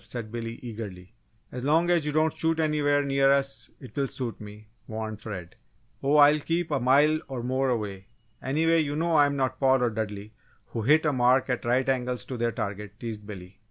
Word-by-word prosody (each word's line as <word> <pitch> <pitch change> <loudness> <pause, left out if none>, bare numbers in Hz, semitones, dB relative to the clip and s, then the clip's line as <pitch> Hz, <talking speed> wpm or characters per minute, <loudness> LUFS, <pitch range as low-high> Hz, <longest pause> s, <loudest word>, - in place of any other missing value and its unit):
said 115 -3 -7
Billy, 115 0 -5
eagerly. 105 -5 -8 0.4
"As 125 0 -6
long 165 +5 +3
as 165 -4 +2
you - - 0
don't 155 +1 +2
shoot 165 0 0
anywhere 145 -2 +2
near 135 -1 +2
us, 135 0 +1
it 130 -6 -12
will 140 -1 0
suit 125 -4 -5
me," 105 0 -11 0.2
warned 110 -1 -5
Fred. 95 -6 -7 0.5
"Oh, 140 +2 +2
I'll 150 +1 +7
keep 165 +2 -2
a 145 - +1
mile 145 +5 +4
or 130 -3 -5
more 130 +2 0
away 100 -5 -3 0.3
anyway, 165 +5 +2
you 145 -1 -2
know 165 +2 0
I 145 -3 +5
am 140 - -2
not 130 -2 -1
Paul 130 -2 +3
or 120 - +1
Dudley, 105 -1 -5 0.4
who 115 - -4
hit 150 +8 +4
a 150 - +2
mark 125 +1 +3
at 125 - -2
right 125 +2 +1
angles 125 -2 -1
to 130 - -6
their 120 0 0
target!" 100 0 -5
teased 110 -3 -6
Billy. 95 -2 -10
130 Hz, 205 wpm, -27 LUFS, 110-145 Hz, 0.5 s, I'll